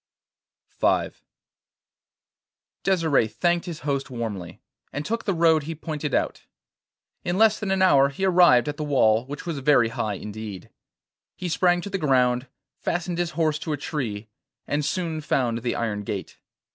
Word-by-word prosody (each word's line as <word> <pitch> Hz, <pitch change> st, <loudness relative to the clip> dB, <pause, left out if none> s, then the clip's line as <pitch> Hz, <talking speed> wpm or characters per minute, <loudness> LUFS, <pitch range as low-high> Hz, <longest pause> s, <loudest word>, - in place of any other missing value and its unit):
V -, -, +2 dB, 1.7 s
Desire 165 Hz, -, +2 dB
thanked 175 Hz, -, 0 dB
his 170 Hz, -2 st, -6 dB
host 140 Hz, -2 st, -2 dB
warmly, 110 Hz, -8 st, -5 dB, 0.3 s
and 145 Hz, +2 st, -4 dB
took 230 Hz, +1 st, -2 dB
the 195 Hz, -, +1 dB
road 165 Hz, -1 st, +4 dB
he 160 Hz, +3 st, -5 dB
pointed 150 Hz, -2 st, -3 dB
out. -, -, -2 dB, 0.8 s
In 175 Hz, +1 st, -1 dB
less 220 Hz, 0 st, +4 dB
than 210 Hz, -, -3 dB
an 190 Hz, 0 st, +2 dB
hour 140 Hz, -7 st, +5 dB
he 190 Hz, +8 st, -2 dB
arrived 175 Hz, -9 st, +5 dB
at 150 Hz, 0 st, -3 dB
the 155 Hz, -, -3 dB
wall, 125 Hz, -5 st, +3 dB
which 145 Hz, +4 st, -7 dB
was 165 Hz, -5 st, -3 dB
very 135 Hz, -4 st, +4 dB
high 110 Hz, -2 st, -2 dB
indeed. 105 Hz, -1 st, -8 dB, 0.6 s
He 180 Hz, -, -4 dB
sprang 175 Hz, +1 st, +2 dB
to 200 Hz, -, -6 dB
the 195 Hz, -, -1 dB
ground, 125 Hz, -4 st, +2 dB, 0.3 s
fastened 175 Hz, 0 st, -2 dB
his 175 Hz, -1 st, 0 dB
horse 155 Hz, -2 st, +1 dB
to 155 Hz, -, -3 dB
a -, -, -2 dB
tree, 115 Hz, -9 st, -4 dB, 0.4 s
and 150 Hz, +1 st, -1 dB
soon 165 Hz, -1 st, -2 dB
found 120 Hz, -5 st, 0 dB
the 120 Hz, +1 st, -2 dB
iron 105 Hz, -3 st, -2 dB
gate. 100 Hz, -1 st, -6 dB
150 Hz, 160 wpm, -25 LUFS, 120-175 Hz, 1.7 s, hour